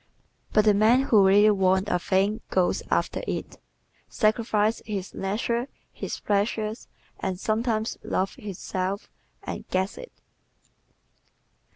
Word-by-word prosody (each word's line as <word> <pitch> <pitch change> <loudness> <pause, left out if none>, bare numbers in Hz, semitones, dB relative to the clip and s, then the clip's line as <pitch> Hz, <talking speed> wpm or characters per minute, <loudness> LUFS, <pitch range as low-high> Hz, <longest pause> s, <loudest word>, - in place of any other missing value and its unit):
But 215 0 +4
the 210 - +6
man 225 +6 +4
who 210 -7 +5
really 205 +2 +6
WANTS 190 0 +2
a 180 - +2
thing 200 +5 +1
GOES 185 -1 +1
AFTER - - 0
it, - - -4 0.5
sacrifices 215 -1 +1
his 200 -3 -4
leisure, 235 +5 -1 0.3
his - - -5
pleasures 215 +2 -1 0.3
and 185 -1 -3
sometimes 220 +1 -1
love 190 +1 -1
itself 195 0 -4 0.3
and - - -5
GETS 190 +2 -1
it. - - -10
210 Hz, 115 wpm, -26 LUFS, 190-220 Hz, 0.5 s, the